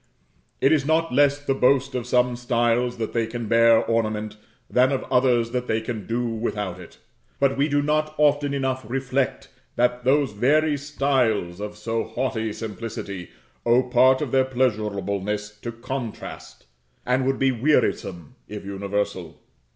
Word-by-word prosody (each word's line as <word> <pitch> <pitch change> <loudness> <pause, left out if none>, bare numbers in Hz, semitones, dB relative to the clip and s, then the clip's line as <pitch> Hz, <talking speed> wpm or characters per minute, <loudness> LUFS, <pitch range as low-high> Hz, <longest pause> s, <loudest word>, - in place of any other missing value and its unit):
It 135 - +4
is 155 -3 +3
not 160 0 +1
less 145 +1 +4
the 145 -1 -1
boast 135 +1 +2
of 125 -2 -3
some 125 0 +2
styles 120 0 0
that 115 -1 -4
they 115 -1 0
can 120 0 -5
bear 115 0 +5
ornament, 110 -2 -1 0.3
than 130 +2 +3
of 135 - -1
others 120 -2 +3
that 125 0 -2
they 110 - +1
can 110 -3 -6
do 120 +2 -1
without 105 -5 -3
it; - - -13 0.4
but 135 -1 +2
we 140 +2 +2
do 145 0 +1
not 155 +1 0
often 145 -1 +3
enough 130 -2 -1
reflect 135 +1 -1 0.3
that 125 0 +1
those 135 0 +2
very 145 +8 +2
styles, 130 -10 0
of 105 0 -6
so 115 +1 -2
haughty 110 -1 -2
simplicity, 105 -4 -6 0.3
owe 120 +2 +4
part 130 +2 +4
of 135 - -5
their 130 -1 +3
pleasurableness 105 -4 -1
to 120 - -4
contrast, 120 0 -7 0.4
and 125 +1 +1
would 135 0 +1
be 135 0 +2
wearisome 115 - 0
if 105 -1 -8
universal. 100 -3 -3
125 Hz, 155 wpm, -24 LUFS, 110-135 Hz, 0.4 s, bear